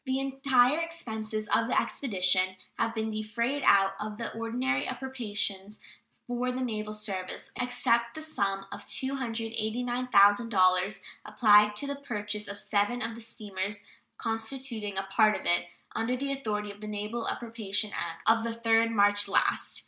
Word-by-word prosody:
The 265 -1 -1
entire 270 +1 +3
expenses 220 -10 -4
of 230 0 +2
the - - +3
expedition 185 -6 0 0.2
have 230 0 0
been 220 0 -1
defrayed 235 +6 -1
out 195 -4 +5
of 210 0 -5
the 230 - -5
ordinary 250 +5 -1
appropriations 215 -6 -3 0.5
for 245 +1 -1
the 255 +1 -3
naval 215 -4 -3
service, 200 -4 -4
except 235 -1 +1
the 315 - -6
sum 195 -10 -1
of - - -9
$289,000, 225 -5 +2 0.2
applied 210 -1 +5
to 280 - 0
the 280 0 -3
purchase 210 -6 -4
of 200 0 -6
seven 205 +4 0
of 225 0 -3
the 230 - -9
steamers 205 -2 -5 0.3
constituting 225 -2 -3
a 195 - 0
part 215 +2 +3
of - - -12
it, 175 0 +2 0.3
under 245 +3 -1
the 275 +2 -2
authority 210 -6 -3
of 205 +1 -14
the 215 - -6
naval 210 +3 -3
appropriation 215 -3 -2
act 165 -1 -4
of 225 0 +5
the 230 - -1
3d 230 0 +2
March 205 -2 +4
last. 200 - +1
225 Hz, 150 wpm, -29 LUFS, 205-245 Hz, 0.5 s, out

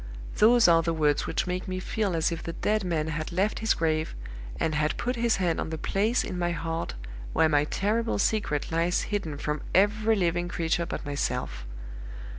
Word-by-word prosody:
Those 235 +1 +6
are 165 -1 +6
the 165 0 -1
words 150 -2 +1
which - - -1
make 180 0 -3
me 185 0 -3
feel 195 -1 -1
as 160 +1 +1
if 165 -1 -4
the 165 - -5
dead 215 +4 0
man 160 -3 -1
had 155 +1 -4
left 195 +5 0
his 220 0 +2
grave, 155 -1 -1 0.4
and 160 - 0
had 150 0 0
put 250 +1 -1
his 235 -1 +2
hand 175 -3 0
on - - -4
the 160 - -4
place 210 +9 +1
in 180 - -4
my 175 0 +1
heart 165 - -3 0.4
where 160 - +4
my 150 -1 +3
terrible 220 +7 0
secret 200 -9 0
lies 170 +3 +1
hidden 160 -8 -2
from 150 +1 -3
every 215 +3 +3
living 175 -2 0
creature 170 0 -1
but - - -5
myself. 125 - -3
170 Hz, 195 wpm, -27 LUFS, 155-205 Hz, 0.4 s, Those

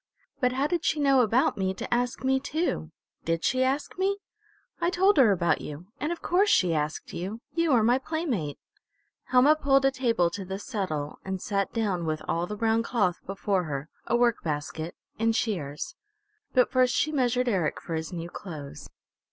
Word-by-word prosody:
But 250 -2 +2
how 270 +2 +1
did 345 +2 0
she 315 - +1
know 275 -2 +5
about 235 -1 +2
me 190 0 0
to - - -3
ask 245 +1 -1
me 265 0 +3
too? 280 - -2 0.3
Did 165 0 -1
she 255 0 +2
ask 275 +7 -1
me?" 395 +1 +1 0.6
"I 340 - +3
told 380 +1 +3
her 250 -7 +7
about 175 -3 +1
you. 150 +6 -8
And 300 - -1
of 345 - -5
course 390 +4 +3
she 180 -3 +4
asked 150 0 -2
you. 195 +6 -4
You 335 -1 +1
are 230 -3 +4
my 245 +4 +4
playmate!" 265 - -2 0.7
Helma 260 +4 +5
pulled 275 -3 +3
a 270 - +5
table 230 -10 +1
to 200 +2 -5
the 190 +1 -5
settle 185 - -4
and 190 0 -3
sat 200 0 -1
down 195 -7 -1
with 155 0 -2
all 170 +1 0
the 210 - -5
brown 225 +1 +2
cloth 205 -7 +1
before 195 -1 0
her, 145 0 -4 0.2
a 235 - +2
work 240 -2 +2
basket, 155 +2 -3 0.2
and 225 0 +2
shears. 150 -12 -2 0.6
But 250 - +3
first 255 -2 +3
she 310 - +1
measured 250 -3 +1
Eric 185 -9 0
for 170 - -6
his 160 0 -3
new 170 -1 -5
clothes. 150 -7 -8
225 Hz, 190 wpm, -27 LUFS, 175-265 Hz, 0.7 s, her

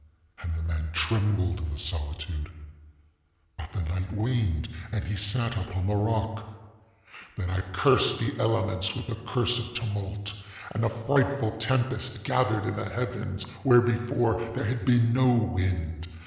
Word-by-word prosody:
And 85 - -4
the 80 - -4
man 80 -1 -2
trembled 100 0 +1
in 85 -2 -4
the 75 - -5
solitude; 80 0 -3 1.1
ŌĆöbut 80 -1 -8
the 95 - -3
night 90 +3 -3
waned 105 -7 0 0.2
and 105 -3 -2
he 105 - -3
sat 115 +4 0
upon 95 -2 -3
the 105 +2 +1
rock. 110 +1 0 0.9
ŌĆ£Then 90 -1 -3
I 95 0 0
cursed 95 - +5
the - - -1
elements 110 -4 +2
with - - -4
the 115 0 -7
curse 120 -1 +2
of 120 +1 -6
tumult; 105 -3 -3 0.4
and 110 - -2
a 115 - +3
frightful 130 +1 +1
tempest 120 -1 0
gathered 110 -2 +1
in 120 - -1
the 110 - -2
heaven 115 -4 -3 0.2
where, 125 -3 +7
before, 120 -1 +1
there - - -1
had 120 +2 -2
been 120 -2 +4
no 130 -1 +5
wind. 95 -8 -1
110 Hz, 155 wpm, -27 LUFS, 95-120 Hz, 1.1 s, where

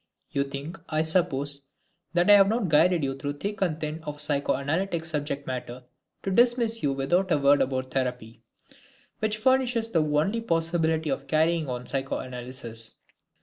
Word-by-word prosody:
You 140 0 0
think, 140 +6 -7
I 155 0 +1
suppose, 145 -5 +1 0.5
that 175 0 +3
I 205 - +9
have 195 -1 +7
not 220 -3 0
guided 165 +2 +4
you 135 -1 -1
through 145 +1 -4
thick 200 +9 -5
and 165 -5 0
thin 155 +1 -4
of 150 -1 -6
psychoanalytic 150 +4 0
subject 145 -3 -3
matter 125 -1 -5 0.4
to 195 - -2
dismiss 235 +1 +3
you 145 - +1
without 175 +8 0
a - - +4
word 140 0 +4
about 130 -1 -1
therapy, 125 -4 -3 0.8
which 215 0 0
furnishes 245 -1 +2
the 170 -7 +2
only 155 +9 +1
possibility 165 -4 0
of 135 +1 -3
carrying 160 +1 +1
on 125 0 -4
psychoanalysis. 125 -4 -5
155 Hz, 155 wpm, -26 LUFS, 135-180 Hz, 0.8 s, I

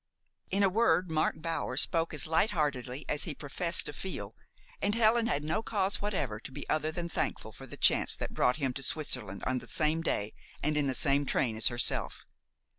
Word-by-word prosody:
In 200 +2 +1
a - - +5
word, 185 -4 +2
Mark 155 0 0
Bower 165 -6 -3
spoke 165 +3 +2
as 150 - +1
lightheartedly 150 - 0
as 150 - +1
he 160 -5 -4
professed 170 +5 -1
to 150 - -2
feel, 190 +6 -5 0.5
and 205 - +1
Helen 230 0 +3
had 145 -8 -1
no 160 +8 -1
cause 200 -3 -2
whatever 145 - -2
to 125 - -10
be 145 +1 -8
other 155 0 0
than 170 +1 -4
thankful - - -3
for - - -11
the - - -9
chance - - +4
that - - -5
brought 125 - +2
him 135 -4 -2
to 135 - -5
Switzerland 125 -9 -3
on 130 0 0
the - - -12
same 155 +1 0
day 105 -10 -1 0.3
and 150 +1 +1
in 150 -2 +1
the 130 - 0
same 140 +1 +3
train 115 -4 0
as 110 - +5
herself. 120 0 +3
155 Hz, 200 wpm, -30 LUFS, 135-175 Hz, 0.5 s, a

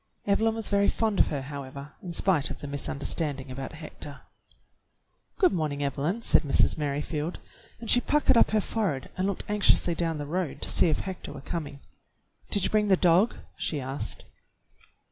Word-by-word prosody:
Evelyn 220 +2 +2
was 225 -2 -3
very 200 0 +3
fond 220 -3 +1
of - - +5
her, 140 -3 -3
however, 140 0 -7
in 180 - -6
spite 170 -4 +3
of - - -5
the - - -9
misunderstanding 140 0 -3
about 135 +3 -6
Hector. 150 -2 -9 1.2
"Good 370 -6 +4
morning, 150 -4 -1
Evelyn," 150 - -1
said - - +5
Mrs. 140 -3 +3
Merrifield, 150 +2 -2 0.4
and 230 - -8
she 245 - +5
puckered 290 -2 +3
up - - +6
her 215 -1 +2
forehead 185 - -2
and 185 +1 0
looked 200 - -2
anx 210 -1 +1
iously 170 - +4
down 165 -2 -1
the 145 - -4
road 160 -2 -2
to - - -2
see - - +4
if 155 - 0
Hector 190 -2 -6
were - - -8
coming. 145 -1 -5 0.7
"Did 200 - +1
you - - +2
bring 210 -1 +3
the 190 -2 +5
dog.^^" 180 +6 +3
she 150 - -2
asked. 135 +2 -4
165 Hz, 185 wpm, -28 LUFS, 145-200 Hz, 1.2 s, up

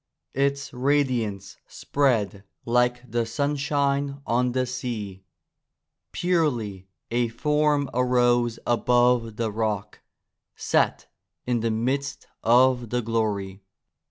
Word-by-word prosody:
Its 140 +1 -1
radiance 125 -7 0
spread 110 -8 0 0.2
like 125 +1 +1
the 120 0 0
sunshine 140 +1 -1
on 125 +1 +1
the 130 0 +1
sea. 115 -7 -5 0.9
Purely 120 - -1 0.2
a 120 0 +1
form 150 +4 +1
arose 120 -1 +2
above 120 -1 +2
the 110 -1 -2
rock, 105 -2 -3 0.5
set - - +1 0.4
in 125 -1 0
the 115 +1 0
midst 135 +5 -2 0.2
of 125 0 +4
the 125 +1 -1
glory. 105 -4 -2
120 Hz, 100 wpm, -25 LUFS, 115-140 Hz, 0.9 s, of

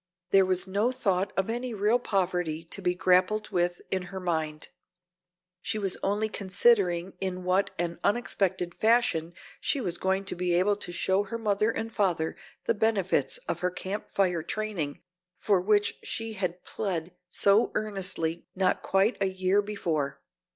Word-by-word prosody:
There 195 -1 +5
was 185 -1 +1
no 205 +6 +1
thought 195 -6 0
of 195 - +1
any 240 +1 -3
real 210 +4 +3
poverty 180 -7 -1
to 170 +4 -5
be 180 -1 +1
grappled 185 +4 +2
with 175 -2 0
in 190 - 0
her 190 - -5
mind. 160 -4 -2 0.9
She 215 - -2
was 195 -3 0
only 205 +2 +1
considering 195 -3 +2
in 185 -1 -3
what 185 +2 +2
an 170 0 -2
unexpected 195 -5 +1
fashion 215 -8 +2 0.2
she 280 - 0
was 175 -9 -2
going 190 +1 0
to - - -2
be 175 0 0
able 195 +4 +3
to 200 -3 -7
show 190 +3 +1
to - - -15
her 230 - -3
mother 210 -1 +1
and 225 0 -3
father 180 -7 0 0.3
the - - +2
benefits 215 - +1
of - - -2
her 180 - +1
Camp 190 +3 -5
Fire 180 -4 +1
training, 190 -7 -3 0.3
for 200 -4 +2
which 205 +1 +2
she 225 0 -3
had 185 -3 -3
plead 180 -4 -3 0.2
so 200 +4 +4
earnestly 185 -6 -1
not 185 -1 +1
quite 195 +5 +2
a 195 - +3
year 190 +2 +2
before. 170 -9 -2
190 Hz, 165 wpm, -28 LUFS, 180-210 Hz, 0.9 s, There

